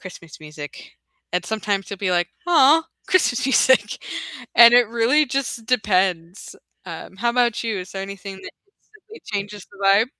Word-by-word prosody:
"Christmas 170 -4 -12
music," 150 -2 -10 0.4
and 180 0 -1
sometimes 205 -2 -3
you'll 200 - -6
be 185 -3 -1
like, 175 0 +1 0.2
"Aw, 320 -1 +5 0.2
Christmas 325 -10 +2
music," 260 0 +2 0.5
and 235 0 +8
it 245 -3 +5
really 235 +6 +2
just 250 -3 -4
depends. 185 -7 -1 0.3
Um, 190 - -9
how 235 +4 0
about 240 -2 +1
you? 220 -4 -2
Is 180 0 -8
there 195 - -5
anything 195 0 -8
that 190 - -11 0.6
instantly - - -14
changes 205 -1 -6
the - - -18
vibe? 200 +4 +4
205 Hz, 160 wpm, -21 LUFS, 185-240 Hz, 0.6 s, and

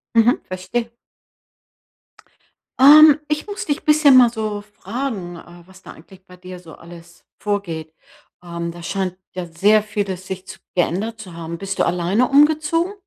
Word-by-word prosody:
Mhm, 230 +2 +4
verstehe. 185 +6 -4 1.9
Ähm, 300 +2 +8
ich 300 +6 -2
muss 405 -2 -6
dich 290 -2 -3
bisschen 300 -3 +5
mal 245 -2 +6
so 215 -3 -4
fragen, 205 -3 -6
äh, 175 +1 -15
was 190 0 -18
da - - -12
eigentlich 185 +3 -18
bei 180 -1 -16
dir 180 0 -11
so 165 -3 -14
alles 170 0 -15
vorgeht. 170 -7 -4 0.5
Ähm, 170 -1 -5
da 170 0 -12
scheint 190 -1 -3 0.2
ja 180 -1 -5
sehr 200 +6 +2
vieles 200 -3 -5
sich 190 0 -7
zu 190 - -11 0.2
geändert 200 +6 -1
zu 185 -5 -11
haben. 170 0 -7
Bist 195 0 -6
du - - +3
alleine 180 +8 0
umgezogen? 310 +5 +2
195 Hz, 155 wpm, -20 LUFS, 175-240 Hz, 1.9 s, Ähm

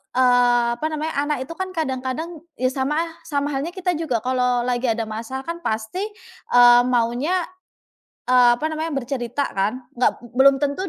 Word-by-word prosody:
eee, 245 -1 +4
apa - - -3
namanya, 310 0 -3
anak 300 - 0
itu 285 - -11
kan 375 0 -4
kadang-kadang 300 +2 -3 0.2
ya 255 +1 0
sama 270 +3 -1
lah 330 +1 -1 0.2
sama 290 -1 -1
halnya 290 +6 -3
kita 370 -1 -1
juga 250 -9 -1
kalau 250 -1 +1
lagi 250 0 -1
ada 225 0 0
masalah 225 +5 -6
kan 335 +2 -5
pasti, 220 +5 -3 0.6
eee, 245 0 +8
maunya, 250 +9 +1 0.8
eee, 245 -1 +5
apa 270 - -7
namanya, 315 -1 -3
bercerita 255 +1 -2
kan? 215 +6 -1
Enggak, 245 0 0
belum 270 +2 +5
tentu 290 +7 -2
260 Hz, 165 wpm, -22 LUFS, 245-310 Hz, 0.8 s, eee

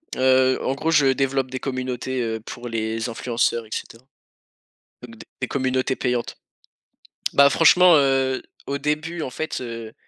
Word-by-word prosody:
Heu, 130 0 +3
en 130 - 0
gros, 160 +4 -1
je 145 -3 +4
développe 135 -1 -1
des 130 - -4
communautés, 130 -1 -3
heu, 110 -1 -2
pour 120 +2 -8
les 115 +1 -3
influenceurs 115 0 -1
et - - -18
cetera, 115 +2 -7 1.0
donc - - -11
d - - -13
des - - -1
communautés 130 -1 0
payantes. 125 -2 -2 1.0
Bah, 140 0 +6
franchement, 175 +3 +6
heu, 135 -1 +1 0.3
au 140 0 -2
début, 155 +4 -2
en 130 - -3
fait, 155 +1 -4
heu, 115 -2 -7
130 Hz, 155 wpm, -22 LUFS, 120-140 Hz, 1.0 s, Bah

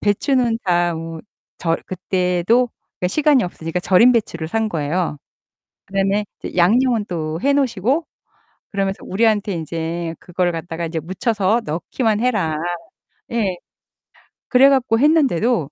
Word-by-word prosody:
배추는 230 +2 +1
다 175 -2 +2
뭐 165 0 -6 0.4
절 165 -1 0
그때도 185 +6 +1 0.3
그러니까 180 - +1
시간이 290 +1 +3
없으니까 165 -1 -4
절인 195 +8 +5
배추를 170 -8 -1
산 220 +5 -1
거예요. 160 -1 -2 0.7
그다음에 195 +2 0 0.2
이제 - - -7
양념은 225 +5 +3
또 160 -1 -3
해 280 - +3
놓으시고 265 - +1 0.6
그러면서 195 -1 -2
우리한테 210 0 +1
인제 165 0 -4
"그거를 180 0 -1
갖다가 165 0 -4
이제 165 0 -3
묻혀서 205 - 0
넣기만 210 - -1
해라." 210 -11 +1 0.8
예. 205 -6 0 0.9
그래 265 +2 +6
갖고 255 -4 +2
했는데도 250 - +2
195 Hz, 300 characters per minute, -20 LUFS, 170-235 Hz, 0.9 s, 그래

